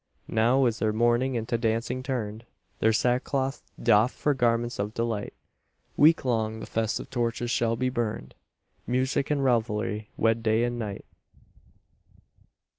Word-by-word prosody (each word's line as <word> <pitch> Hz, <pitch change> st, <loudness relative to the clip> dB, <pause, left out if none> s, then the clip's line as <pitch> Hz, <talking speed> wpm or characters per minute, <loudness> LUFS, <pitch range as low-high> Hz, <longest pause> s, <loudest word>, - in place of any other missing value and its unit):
Now 120 Hz, +4 st, +3 dB
is 115 Hz, -2 st, 0 dB
their 110 Hz, -, +1 dB
mourning 120 Hz, +4 st, +2 dB
into 115 Hz, 0 st, -1 dB
dancing 115 Hz, +2 st, -1 dB
turned, 115 Hz, -4 st, -4 dB, 0.3 s
Their 110 Hz, -, +4 dB
sackcloth 130 Hz, +4 st, 0 dB, 0.2 s
doffed 115 Hz, +1 st, +3 dB
for 145 Hz, -, +1 dB
garments 120 Hz, -1 st, 0 dB
of 105 Hz, +2 st, -3 dB
delight, 115 Hz, -3 st, -2 dB, 0.6 s
Week 155 Hz, 0 st, +5 dB
long 110 Hz, -3 st, 0 dB
the -, -, -6 dB
festive 110 Hz, +2 st, -2 dB
torches 120 Hz, -1 st, -1 dB
shall 115 Hz, -1 st, +1 dB
be 130 Hz, +2 st, 0 dB
burned, 110 Hz, -, -3 dB, 0.5 s
Music 130 Hz, +3 st, 0 dB
and 145 Hz, -2 st, +1 dB
revelry 110 Hz, -3 st, 0 dB
wed 115 Hz, +1 st, +2 dB
day 110 Hz, +1 st, +2 dB
with 120 Hz, 0 st, 0 dB
night. 110 Hz, -4 st, -5 dB
115 Hz, 135 wpm, -27 LUFS, 110-125 Hz, 0.6 s, Week